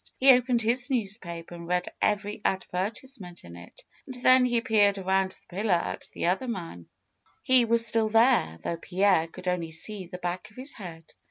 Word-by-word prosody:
He 270 +1 +7
opened 245 -1 +2
his 240 +2 0
newspaper 195 -9 -3
and 170 -1 -9
read 180 0 -1
every 210 0 0
advertisement 190 +1 -3
in 85 0 -11
it. 85 +1 -13 0.2
And 260 - -5
then 255 0 +6
he 240 -1 +2
peered 210 -4 +3
around 190 0 +1
the 180 - -12
pillar 205 -3 +2
at 170 - -4
the - - -3
other 190 +9 0
man; 165 - -6 0.6
he 255 -2 +4
FAITH - - -10
273 - - -4
was 230 0 +3
still 220 0 +1
there, 225 - +3
though 170 - -2
Pierre 185 -3 +2
could 185 +3 -11
only 180 -2 -1
see 185 +4 -5
the 180 - -8
back 180 +3 -4
of 210 - -22
his 265 +3 -3
head. 165 -6 -10
200 Hz, 195 wpm, -27 LUFS, 175-235 Hz, 0.6 s, He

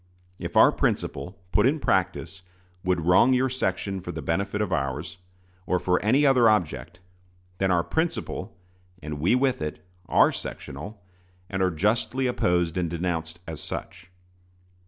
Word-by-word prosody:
If - - -3
our - - +8
principle, 90 +8 -2
put 105 +4 +4
in 150 +4 +1
practice, 95 -3 -1 0.4
would 90 -2 +1
wrong 95 +9 +5
your 130 +1 +2
section 95 -5 -2
for 90 -1 -6
the 80 -3 -6
benefit 100 +6 -1
of 105 - -1
ours, 75 +3 -2 0.5
or 90 - +2
for 90 +1 +1
any 130 +8 +4
other 125 -4 +5
object, 85 - -1 0.6
then 95 - +2
our 85 -2 +3
principle, 160 - -2 0.5
and 75 -1 -5
we 90 +11 +3
with 130 -4 +1
it, 75 +3 -5 0.2
are - - +5
sectional, 100 +10 -7 0.5
and 95 -1 -1
are 95 - +3
justly 105 +9 0
opposed 90 -9 +1
and 90 -2 0
denounced 85 -1 -3
as 80 -2 -6
such. - - -7
90 Hz, 150 wpm, -26 LUFS, 85-110 Hz, 0.6 s, our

